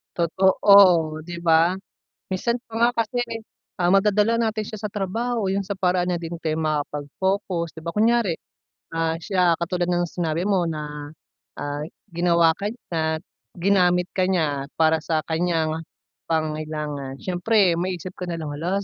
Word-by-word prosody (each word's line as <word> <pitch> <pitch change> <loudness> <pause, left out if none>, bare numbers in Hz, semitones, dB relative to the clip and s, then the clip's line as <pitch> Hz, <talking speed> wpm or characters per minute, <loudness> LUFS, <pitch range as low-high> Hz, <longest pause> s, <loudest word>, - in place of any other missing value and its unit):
Totoo, 180 -2 +5
‘di 175 - -5
ba? 165 +2 +4 0.5
Minsan 235 +5 -1
pa 225 - -17
nga 235 +1 +4
kasi, 240 +1 -1 0.6
ah, 175 - +2
madadala 210 +4 +3
natin 220 -2 -1
siya - - -6
sa 210 - -3
trabaho. 220 +2 -2
Yung 195 +1 0
sa 195 - -7
paraan 180 -2 +1
niya 175 - -1
din 170 0 -5
kayo 155 0 -1
makakapag 150 -2 -2
focus 190 -3 -1
'di 160 - -10
ba? 170 +1 -6
Kunyari, 225 -4 +3 0.6
ah, 165 0 0
siya 180 -3 +3
katulad 175 +1 -2
ng 175 0 +1
sinabi 170 -1 -2
mo 190 -3 +1
na, 150 -1 -6 0.4
ah, 145 0 -4 0.3
ginawa 170 -1 +4
ka 200 - -1
niya, 160 -8 -3 0.3
ginamit 180 -1 +2
ka 185 -1 +1
niya 150 -7 0
para 160 0 +3
sa 155 0 -1
kaniyang 160 -1 0 0.5
pangangailangan. 155 -3 -3
Siyempre 185 -1 +2
maisip 180 0 -3
ko 180 0 -7
nalang, 165 -3 -4
“Hala, 175 +7 -2
175 Hz, 150 wpm, -23 LUFS, 160-195 Hz, 0.6 s, Totoo